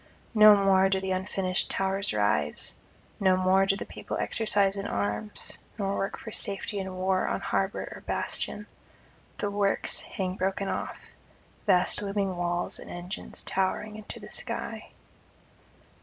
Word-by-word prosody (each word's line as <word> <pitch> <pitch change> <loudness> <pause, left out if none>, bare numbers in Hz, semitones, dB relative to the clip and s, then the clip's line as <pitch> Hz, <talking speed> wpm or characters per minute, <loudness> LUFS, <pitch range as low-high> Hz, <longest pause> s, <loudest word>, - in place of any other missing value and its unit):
No 215 -1 +9
more 195 -1 +4
do 190 0 +2
the 190 0 -3
unfinished 185 0 0
towers 195 +1 0
rise, 105 -8 +1 0.4
no 190 -2 +4
more 190 +1 +4
do 195 - +3
the - - -5
people - - -6
exercise 200 -3 +2
in 200 0 -3
arms, 105 - -2 0.2
nor 200 -1 -1
work 195 - -2
for 220 - -8
safety 200 0 -2
in 190 -1 -4
war 185 0 +1
on - - 0
harbour 195 0 -1
or - - -9
bastion; 210 - -2 0.7
the 205 - -1
works 200 -1 +2
hang 185 -1 -4
broken 195 +1 -1
off, - - -3 0.7
vast 185 +1 +4
looming 200 -2 -1
walls 175 0 -1
and - - -10
engines 175 +3 -4
towering 195 +3 -1
into 215 -1 -6
the - - -11
sky. - - -3
195 Hz, 145 wpm, -28 LUFS, 185-200 Hz, 0.7 s, No